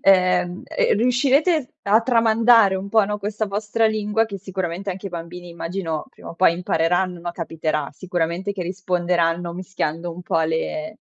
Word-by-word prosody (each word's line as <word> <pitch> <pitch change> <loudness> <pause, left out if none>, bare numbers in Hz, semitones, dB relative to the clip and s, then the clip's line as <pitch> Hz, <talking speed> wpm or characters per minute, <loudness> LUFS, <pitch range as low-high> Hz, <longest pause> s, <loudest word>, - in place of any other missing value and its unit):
ehm 180 -2 +3
ehm, - - +1
riuscirete 265 - +2
a 210 +3 +4
tramandare 230 -3 +4
un 190 +1 -5
po' 220 0 +4
no, 210 +1 -3
questa 210 +1 -2
vostra 210 +3 0
lingua 215 +1 +1
che 200 -3 -7
sicuramente 190 0 -4
anche 190 +2 -6
i - - -3
bambini 175 +1 -8
immagino, 170 -1 -4
prima - - -13
o - - -9
poi 180 -1 +4
impareranno, 175 +1 0
no, 175 0 -4
capiterà 155 -3 -2
sicuramente 175 +3 -2
che 190 -3 -4
risponderanno 175 -2 0
mischiando 175 -2 -3
un 180 +2 -9
po' 165 - 0
le 205 +7 -2
185 Hz, 160 wpm, -22 LUFS, 170-210 Hz, -, a